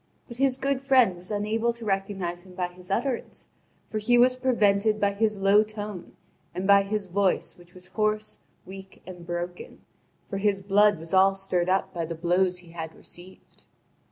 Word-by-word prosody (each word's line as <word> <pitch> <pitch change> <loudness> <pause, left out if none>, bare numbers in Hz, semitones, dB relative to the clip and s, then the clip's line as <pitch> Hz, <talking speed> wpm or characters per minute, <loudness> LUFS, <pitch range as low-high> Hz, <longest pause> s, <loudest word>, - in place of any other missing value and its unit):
But 235 - -10
his 265 -1 +1
good 275 0 -1
friend 260 -8 +4
was 175 +1 -11
unable 220 +3 0
to 235 -1 -8
recognise 195 -3 -2
him 185 -1 -15
by 180 -1 -2
his 180 0 -15
utterance; 240 +5 -3 0.4
for 215 - -3
he 240 +3 +3
was 250 +1 +5
prevented 215 -4 +2
by 200 -1 +2
his 215 0 0
low 195 +2 +5
tone 210 -3 -7 0.4
and 185 - -3
by 200 0 +6
his 200 +1 -2
voice 190 +1 0
which 175 0 -20
was 180 0 -7
hoarse, 215 +2 -2 0.3
weak, 190 +1 -12
and 180 -2 -11
broken; 175 +1 -6 0.5
for 195 - -4
his 200 -1 +1
blood 205 +1 +3
was 165 +3 -7
all 190 +1 +5
stirred 185 -2 -1
up 190 0 0
by 170 -2 -3
the 165 +1 -5
blows 180 +2 +1
he 175 -2 -13
had 160 -1 -7
received. 180 +2 -14
195 Hz, 185 wpm, -26 LUFS, 180-215 Hz, 0.5 s, by